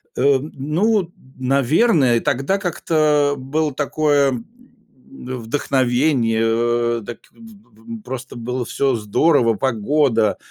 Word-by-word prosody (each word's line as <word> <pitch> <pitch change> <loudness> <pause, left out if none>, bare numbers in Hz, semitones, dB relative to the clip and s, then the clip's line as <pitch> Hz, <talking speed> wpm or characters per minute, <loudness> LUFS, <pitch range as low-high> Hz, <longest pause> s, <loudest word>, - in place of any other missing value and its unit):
Эм, 140 +2 +1
ну, 175 +7 0 0.3
наверное, 135 - +2
тогда 135 +10 0
как-то 155 -5 +1
было 145 +3 -2
такое, 145 0 +1
м, 120 -3 -5 1.0
вдохновение, 125 -1 0 0.6
э, - - -11
так, 120 - -8
п - - -35
п 200 - -13
п - - -18
просто 130 0 -7
было 125 +1 -4
всё 135 +1 0
здорово: 115 +3 +2
погода, 115 -1 +1
135 Hz, 110 wpm, -19 LUFS, 120-155 Hz, 1.0 s, наверное